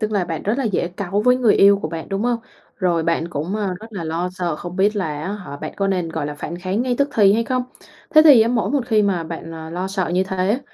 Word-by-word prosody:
tức 215 -1 -1
là 200 -3 +1
bạn 165 -2 -4
rất 215 +6 -1
là 270 - -1
dễ 195 -5 0
cáu 195 +2 -2
với 250 +3 +4
người 245 -4 +3
yêu 200 0 +6
của - - -2
bạn, 165 -1 -6
đúng 195 +1 -2
không? 240 0 +1 0.4
Rồi 175 -4 +1
bạn 165 0 0
cũng, 170 +6 -3
à, 200 -3 -2
rất 220 +1 -12
là 185 -5 -5
lo 165 +3 -2
sợ, 175 -4 -2
không 175 +2 -8
biết 205 +2 +2
là 155 -6 -2
á 190 - -3
hả 190 -9 -7
bạn 155 +2 -6
có 195 - 0
nên, 180 -3 -1
gọi 155 -3 -3
là, 150 - -5
phản 160 +4 -6
kháng 185 +5 -1
ngay 250 -1 0
tức 280 0 +2
thì 200 -3 +5
hay 230 +2 +1
không. 255 +1 0 0.5
Thế 310 - +7
thì 285 -7 +8
á 220 - +4
mỗi 235 -2 0
một 275 -4 0
khi 220 -3 +3
mà 190 -5 0
bạn, 165 0 -7
ờ, 160 0 -8
lo 180 +3 -3
sợ 190 -3 -2
như 180 +2 +1
thế, 190 +4 0
190 Hz, 290 wpm, -20 LUFS, 170-215 Hz, 0.5 s, thì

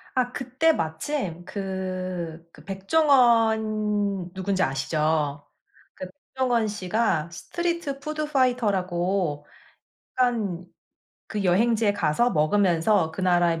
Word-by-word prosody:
아 250 -1 +1
그때 265 +6 +1
마침 170 - -3
그 185 -4 -5
그 - - -16
백종원 215 - +2
누군지 190 0 -1
아시죠? 145 +1 0 0.5
그 185 - -7 0.3
백종원 245 -4 +1
씨가 190 -4 -1
스트리트 340 - -3
푸드 305 +1 -3
파이터라고 190 - 0 0.7
한 215 -9 0 0.6
그 210 -2 -3
여행지에 210 +3 +2
가서 205 +5 +1
먹으면서 170 +2 +2
그 185 - -6
나라의 175 -2 +2
195 Hz, 215 characters per minute, -25 LUFS, 175-235 Hz, 0.7 s, 백종원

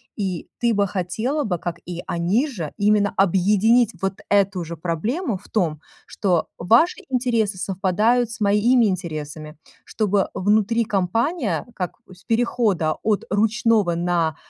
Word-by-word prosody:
И 190 -5 -3
ты 235 -1 +2
бы 200 -1 +2
хотела 220 - -2
бы, 185 -7 -1
как 170 0 -5
и 175 0 -6
они 185 - +1
же, 175 - -5
именно 205 -1 +2
объединить 205 +5 +3
вот 195 0 -2
эту 200 -2 +2
же 170 +1 -7
проблему 205 - -2
в - - -19
том, 160 -8 -1 0.2
что: 180 -6 0
"Ваши 230 - +3
интересы 235 -6 0
совпадают 205 +6 +1
с 230 - -8
моими 215 +4 +4
интересами". 155 -5 -4 0.3
Чтобы 205 -3 0
внутри 215 +4 +2
компания, 210 - -1
как 180 -2 -4 0.2
с 180 - -19
перехода 225 -8 +1
от 215 -2 0
ручного 215 -2 +2
на, 170 -2 0
200 Hz, 135 wpm, -22 LUFS, 175-230 Hz, 0.3 s, моими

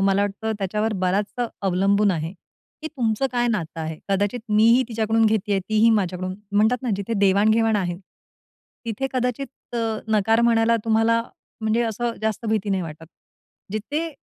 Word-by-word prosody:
मला 195 +1 +3
वाटतं 205 +2 -2
त्याच्यावर 210 +3 -1
बराचसा 205 +6 0 0.2
अवलंबून 195 +2 +3
आहे, 165 -1 -2 0.5
की 315 - -3
तुमचं 230 +1 +1
काय 240 -1 +1
नातं 170 -7 -3
आहे. 160 0 -5
कदाचित 205 +4 0
मी 210 +1 +4
ही 260 - +3
तिच्याकडून 225 0 +2
घेतीये, 210 -2 +1
तीही 215 +1 +4
माझ्याकडून 185 -3 0 0.2
म्हणतात 220 +5 +2
ना 250 - -1
जिथे 200 +3 -4
देवाण-घेवाण 215 +3 +3
आहे. 175 -3 -1 0.9
तिथे 230 +4 -2
कदाचित 250 0 -4
अ, - - 0 0.3
नकार 220 +1 +3
म्हणायला 230 -1 +3
तुम्हाला 225 +1 +3 0.4
म्हणजे 220 +2 +1
असं 230 +1 -2
जास्त 220 +1 -2
भीती 215 -2 0
नाही 190 -1 0
वाटत. 160 -1 -8 0.7
जिथे 295 +10 -2
215 Hz, 150 wpm, -23 LUFS, 195-230 Hz, 0.9 s, मी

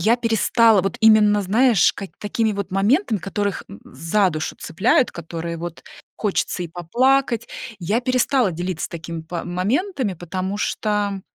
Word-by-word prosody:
я 225 +7 +3
перестала 230 -2 +3
вот 195 0 -3
именно, 210 -2 +5
знаешь, 215 - +3
ка 195 - -7
какими 220 +1 0
вот 200 -2 -4
моментами, 215 - +1
которых, 200 +2 -3
м, 100 - -11
за 165 +8 0
душу 155 -1 -4
цепляют, 230 +8 +1
которые 170 0 -6
вот 170 0 -7 0.3
хочется 195 -3 -1
и 170 - -5
поплакать, 235 +8 +1 0.3
я 205 +7 0
перестала 255 -3 +1
делиться 175 0 -4
такими 165 -1 -7
па 165 +1 -5
моментами, 220 - -1
потому 185 +3 -4
что, 205 -2 -1
200 Hz, 145 wpm, -21 LUFS, 175-230 Hz, 0.3 s, именно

